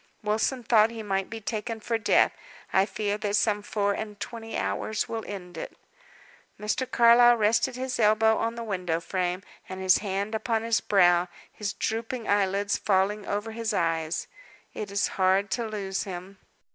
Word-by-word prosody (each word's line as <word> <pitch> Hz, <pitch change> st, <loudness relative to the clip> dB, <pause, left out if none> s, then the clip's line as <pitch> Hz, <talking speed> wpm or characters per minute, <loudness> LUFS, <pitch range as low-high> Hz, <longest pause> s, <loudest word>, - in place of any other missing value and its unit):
Wilson 220 Hz, +4 st, 0 dB
thought 220 Hz, -1 st, +5 dB
he 225 Hz, -1 st, -7 dB
might 195 Hz, -2 st, -1 dB
be 225 Hz, -, -6 dB
taken 225 Hz, +1 st, -4 dB
for 230 Hz, +1 st, -2 dB
death. 220 Hz, -, +4 dB, 0.4 s
I 190 Hz, +1 st, +4 dB
fear 210 Hz, -1 st, -2 dB
that 205 Hz, -1 st, -1 dB
some 210 Hz, -1 st, +2 dB
four 205 Hz, -1 st, 0 dB
and 210 Hz, 0 st, -6 dB
twenty 225 Hz, -2 st, -6 dB
hours 220 Hz, 0 st, -2 dB
will 225 Hz, -1 st, -4 dB
end 180 Hz, -4 st, -8 dB
it." -, -, -7 dB, 0.8 s
Mr. 215 Hz, +5 st, -2 dB
Carlyle 240 Hz, +1 st, +6 dB
rested 225 Hz, +4 st, +2 dB
his 255 Hz, 0 st, -3 dB
elbow 220 Hz, +1 st, +4 dB
on 230 Hz, +1 st, -1 dB
the 235 Hz, -, -5 dB
window 180 Hz, -6 st, -2 dB
frame, 180 Hz, +1 st, -2 dB, 0.3 s
and 185 Hz, -, -6 dB
his 185 Hz, -1 st, +4 dB
hand 200 Hz, +1 st, -3 dB
upon 220 Hz, 0 st, -1 dB
his 230 Hz, 0 st, +1 dB
brow, 175 Hz, -3 st, +4 dB, 0.3 s
his 210 Hz, -1 st, -4 dB
drooping 225 Hz, +2 st, -3 dB
eyelids 200 Hz, 0 st, +1 dB
falling 200 Hz, +1 st, +1 dB
over 210 Hz, +2 st, -2 dB
his 225 Hz, -1 st, -2 dB
eyes. 165 Hz, -2 st, -1 dB, 0.5 s
"It 210 Hz, -, -5 dB
is 200 Hz, 0 st, +1 dB
hard 190 Hz, +2 st, +3 dB
to 235 Hz, -2 st, -1 dB
lose 195 Hz, -3 st, -3 dB
him." 190 Hz, +1 st, -7 dB
210 Hz, 170 wpm, -27 LUFS, 195-225 Hz, 0.8 s, Carlyle